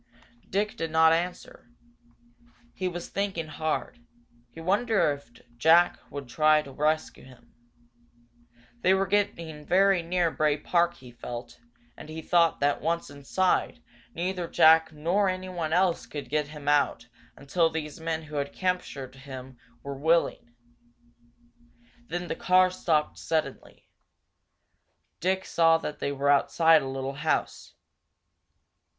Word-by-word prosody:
Dick 205 +2 -1
did 165 - -3
not 160 0 +5
answer. 175 -6 -4 1.0
He 185 - -3
was 175 -1 -5
thinking 195 -4 -2
hard. 155 +9 -3 0.5
He 165 - -13
wondered 200 -1 +2
if 140 -4 -25 0.3
Jack 165 +7 +4
would 140 -2 -7
try 155 +4 +3
to 140 - -11
rescue 155 +3 -1
him. 130 -1 -18 1.3
They 185 +8 +3
were 195 0 +1
getting 170 -6 -1
very 190 +2 +3
near 170 0 0
Bray 150 -1 +1
Park, 170 +3 +1
he 125 -2 -14
felt, 120 0 -8 0.4
and 155 - -12
he 160 0 -7
thought 170 -1 +3
that, 145 0 +1
once 170 -2 -2
inside, 180 - 0 0.4
neither 180 0 -2
Jack 160 0 +5
nor 175 +6 +1
anyone 185 -3 -4
else 180 0 +1
could 145 -2 -7
get 150 -1 0
him 150 -1 -11
out 145 -5 +2 0.3
until 165 +4 +1
these 155 -1 -5
men 160 0 -3
who 150 -1 -7
had 140 0 -3
captured 180 -8 -3
him 130 -2 -10 0.2
were 140 - -5
willing. 160 -5 +1 1.6
Then 175 -4 -4
the - - -3
car 185 +1 +3
stopped 160 -4 0
suddenly. 155 -4 -4 1.3
Dick 190 +2 0
saw 165 -1 +4
that 150 -2 -6
they 140 - -2
were 140 0 +1
outside 160 +3 +4
a 135 - -5
little 135 0 -4
house. 150 +3 -2
160 Hz, 130 wpm, -27 LUFS, 145-180 Hz, 1.6 s, not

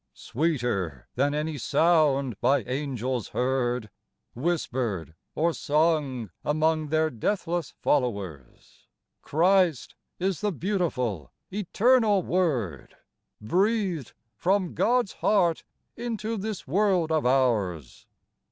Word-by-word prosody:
Sweeter 120 - -2
than 145 +3 +1
any 150 -1 -2
sound 145 -4 +3
by 140 +1 +3
angels 130 -3 -3
heard, 125 -3 -1 0.4
Whispered 120 - -2 0.2
or 170 +2 +1
sung 145 - 0
among 155 +1 +1
their 155 +1 +1
deathless 170 - -2
flow 125 -7 +2
ers, 75 -10 -12 0.3
Christ 175 -2 +2 0.2
is 185 -1 -1
the 210 -1 +1
beautiful, 150 - -2 0.2
eternal 210 +1 +3
Word, 125 - -1 0.4
Breathed 185 - 0 0.2
from 185 - 0
God's 245 -3 +1
heart 175 -6 +2 0.3
into 230 -1 -3
this 210 -1 -4
world 180 0 +2
of 155 -1 +2
ours. 105 - 0
155 Hz, 95 wpm, -26 LUFS, 125-185 Hz, 0.4 s, sound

